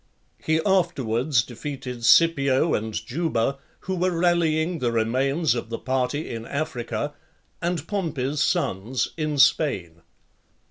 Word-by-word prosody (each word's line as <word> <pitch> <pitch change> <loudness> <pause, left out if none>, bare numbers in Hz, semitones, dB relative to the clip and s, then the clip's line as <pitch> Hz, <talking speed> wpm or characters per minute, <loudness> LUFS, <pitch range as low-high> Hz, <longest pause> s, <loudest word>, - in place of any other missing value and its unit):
He 160 0 +2
afterwards 140 - +2
defeated 125 0 -7
Scipio 140 +1 +4
and 110 +1 -1
Juba, 135 +1 -1 0.2
who 190 - -3
were 180 +1 +1
rallying 170 -1 +1
the 120 -3 0
remains 130 +7 +1
of 120 -2 -4
the 115 - -3
party 130 +3 -1
in 115 -1 -5
Africa, 140 -5 -3 0.5
and 175 0 -2
Pompey's 150 -8 -2
sons 120 - 0
in 155 -2 -2
Spain. 90 - +2
140 Hz, 120 wpm, -24 LUFS, 120-165 Hz, 0.5 s, Scipio